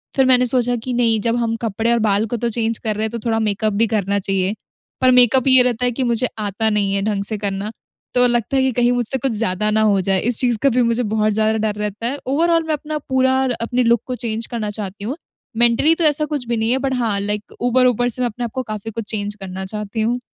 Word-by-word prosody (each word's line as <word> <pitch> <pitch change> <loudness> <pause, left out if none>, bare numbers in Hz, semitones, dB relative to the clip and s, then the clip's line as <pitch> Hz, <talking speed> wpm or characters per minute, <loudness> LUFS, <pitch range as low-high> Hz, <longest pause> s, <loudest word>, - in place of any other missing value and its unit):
फिर 265 - +3
मैंने 250 -1 +4
सोचा 245 0 +3
कि 250 0 -3
नहीं 230 -2 +2
जब 230 +1 0
हम 230 -1 -1
कपड़े 225 +2 0
और 235 - +2
बाल 205 +1 +2
को 240 - -1
तो 235 - -2
चेंज 225 0 -1
कर 215 -2 -3
रहे 215 - -2
हैं, 220 - -4
तो 235 - -5
थोड़ा 225 -1 +1
मेकअप 215 0 -1
भी 225 +3 +2
करना 200 -2 -1
चाहिए। 195 +1 -1 0.5
पर 255 0 +5
मेकअप 250 +1 +5
ये 260 -1 +7
रहता 250 -1 0
है 245 - +1
कि 255 +2 -2
मुझे 240 +1 +1
आता 210 +1 -1
नहीं 205 -2 0
है 200 - 0
ढंग 205 -2 -1
से 215 +1 -2
करना, 200 +1 -3 0.4
तो 250 0 +5
लगता 240 +2 0
है 265 - +3
कि 265 - +1
कहीं 240 - +3
मुझसे 245 +1 0
कुछ 260 0 -1
ज़्यादा 210 -1 -1
ना 220 0 +2
हो 205 -3 +3
जाए, 190 0 +1
इस 240 0 0
चीज़ 245 -3 +2
का 275 - +5
भी 250 0 +1
मुझे 235 +1 +1
बहुत 215 0 0
ज़्यादा 220 +1 +1
डर 205 - -4
रहता 210 +2 -3
है। 270 +4 -3
ओवरॉल 330 +4 +2
मैं 315 - 0
अपना 305 +1 -4
पूरा 260 0 +2
र 260 - -1
अपने 245 +2 0
लुक 235 -1 +3
को 255 - -3
चेंज 225 -2 -2
करना 225 -4 -4
चाहती 200 -1 -6
हूँ। 270 +7 -4 0.4
मेंटली 240 +7 +3
तो 335 - -2
ऐसा 300 0 +3
कुछ 290 -5 -4
भी 235 -1 -1
नहीं 225 +1 0
है, 260 - +3
बट 265 -1 -1
हाँ, 225 -5 0
लाइक 205 +1 -4
ऊपर-ऊपर 245 -1 +2
से 250 - -5
मैं 245 - +2
अपने 240 +2 -5
आप 230 - -6
को 260 - -2
काफ़ी 215 -1 -6
कुछ 225 0 -5
चेंज 205 -1 -3
करना 190 -1 -7
चाहती 210 +2 -4
हूँ। 240 +3 0
230 Hz, 265 wpm, -19 LUFS, 210-250 Hz, 0.5 s, ये